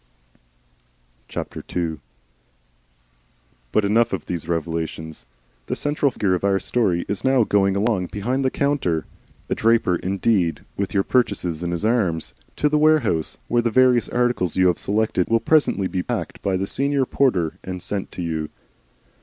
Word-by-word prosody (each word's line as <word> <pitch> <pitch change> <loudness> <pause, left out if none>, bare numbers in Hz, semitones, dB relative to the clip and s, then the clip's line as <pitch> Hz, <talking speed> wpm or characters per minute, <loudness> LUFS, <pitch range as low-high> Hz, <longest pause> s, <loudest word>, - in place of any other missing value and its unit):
II 80 -3 -4 1.7
But 105 - +2
enough 115 +2 +2
of 95 - -3
these 85 -2 -4
revelations. 80 -1 -4 0.4
The - - -1
central 145 -1 +1
figure 100 -7 0
of 90 - -1
our 100 -1 +3
story 95 -9 0
is 100 - -3
now 130 -2 +4
going 100 -2 +2
along 100 -3 +1
behind 125 +8 -2
the 130 - +3
counter, 130 - 0 0.4
a - - 0
draper 110 -6 +2
indeed, 95 -4 0
with 100 0 -3
your 95 - +3
purchases 95 -10 0
in 85 - -2
his 85 +4 -2
arms, 100 -9 +1 0.2
to 150 - +2
the 150 0 +2
warehouse, 155 - +2
where 120 0 +2
the 115 - +1
various 125 0 +4
articles 120 -9 0
you 95 - +3
have 85 - -1
selected 105 -3 0
will 115 0 +3
presently 145 -9 +2
be 95 -1 -1
packed - - -4
by 95 -1 0
the 95 - -1
senior 140 +4 0
porter 95 - +1
and 90 0 -5
sent 100 -2 -4
to 90 - -4
you. 80 -2 -3
100 Hz, 155 wpm, -22 LUFS, 85-120 Hz, 1.7 s, now